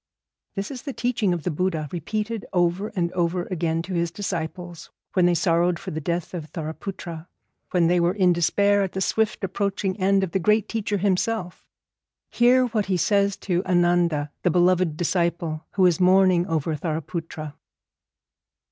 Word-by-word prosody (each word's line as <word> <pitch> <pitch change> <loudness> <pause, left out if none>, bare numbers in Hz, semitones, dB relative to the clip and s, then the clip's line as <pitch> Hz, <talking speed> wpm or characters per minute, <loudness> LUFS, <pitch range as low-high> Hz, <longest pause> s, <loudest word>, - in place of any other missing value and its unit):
This 195 +4 -3
is 255 -3 -6
the 275 - -6
teaching 235 -6 0
of 170 -3 -2
the 180 - -1
Buddha, 160 -1 -1
repeated 215 +6 -3
over 175 +3 +1
and 170 -2 0
over 175 0 0
again 165 -2 -1
to 185 - -6
his 170 -1 0
disciples 175 -2 -5 0.2
when 180 -2 +4
they 175 - +3
sorrowed 170 0 +2
for - - -7
the 155 - -4
death 170 +4 -3
of 165 -4 -5
Thariputra, 165 0 -6 0.4
when 175 -2 +2
they 175 +1 +3
were 175 +2 +2
in 185 -3 +4
despair 200 +4 +2
at 190 -2 -2
the 190 - -3
swift 220 +2 0
approaching 195 0 -1
end 195 +1 +3
of 185 - -2
the 190 - 0
great 210 +3 +2
teacher 210 -2 -2
himself. 190 0 -1 0.6
Hear 250 +2 +4
what 220 -4 -1
he 190 -2 +1
says 200 +3 +2
to 180 -1 +1
Ananda, 175 -4 +2
the 180 - +2
beloved 175 -2 +2
disciple, 170 -2 -1
who 190 -2 +3
is 180 -1 +3
mourning 185 -1 +4
over 160 -2 -1
Thariputra. 155 0 -5
180 Hz, 165 wpm, -24 LUFS, 170-195 Hz, 0.6 s, when